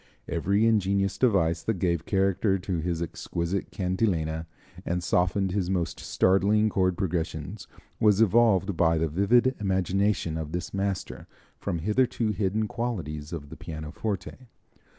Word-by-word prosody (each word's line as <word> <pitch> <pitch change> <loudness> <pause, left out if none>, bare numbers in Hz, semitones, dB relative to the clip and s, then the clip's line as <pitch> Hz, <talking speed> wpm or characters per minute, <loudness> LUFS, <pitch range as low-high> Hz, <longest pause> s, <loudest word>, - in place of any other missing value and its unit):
Every 100 +6 +1
ingenious 100 -3 +2
device 85 -9 +2
that 110 -3 -1
gave 85 -2 -1
character 95 0 +2
to 90 -1 -3
his 85 0 -2
exquisite 85 +3 -3
cantilena, 90 -4 -1 0.4
and 90 0 -2
softened 90 +2 +1
his 95 -2 -1
most 90 -3 -1
startling 105 +3 +2
chord 95 -3 +1
progressions, 85 +2 -3 0.3
was 105 -2 +4
evolved 105 -3 +4
by 80 0 +3
the 80 +1 +1
vivid 110 - +3
imagination 95 -3 0
of 80 0 -6
this 90 0 -4
master 100 -1 -3 0.3
from 85 - -2
hitherto 110 +5 +1
hidden 105 +1 0
qualities 85 -12 -4
of 75 -4 -6
the - - -9
pianoforte. 90 +10 -5
95 Hz, 130 wpm, -27 LUFS, 85-105 Hz, 0.4 s, was